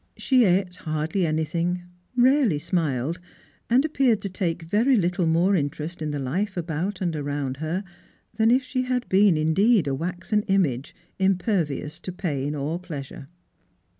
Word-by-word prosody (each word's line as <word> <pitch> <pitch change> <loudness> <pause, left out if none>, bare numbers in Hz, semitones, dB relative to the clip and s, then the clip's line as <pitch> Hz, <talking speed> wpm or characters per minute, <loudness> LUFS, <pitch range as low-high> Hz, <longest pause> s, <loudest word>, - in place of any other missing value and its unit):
She 255 -3 +3
ate 180 -1 +1
hardly 160 +1 -1
anything, 165 +3 -1 0.3
rarely 250 - +4
smiled, 150 -2 -1 0.5
and 255 +5 +4
appeared 270 -8 +2
to 200 - -2
take 170 -2 -2
very 220 +10 +3
little 180 -2 +1
more 175 +5 +3
interest 150 +2 -3
in 155 - -2
the 145 - -2
life 185 +10 -2
about 175 +4 -3
and 170 -3 -1
around 145 -2 -3
her 160 +6 -2 0.5
than 220 +1 +3
if 255 +3 +4
ohe 255 0 +1
had 250 -1 -1
been, 195 -1 +5
indeen, 170 +6 +3
a 140 - 0
waxen 180 +8 -1
image, 155 - 0 0.2
impervious 180 -5 0
to 185 - -6
pain 150 -5 -3
or 150 +4 -2
pleasure. 145 -6 -8
175 Hz, 150 wpm, -25 LUFS, 155-200 Hz, 0.5 s, been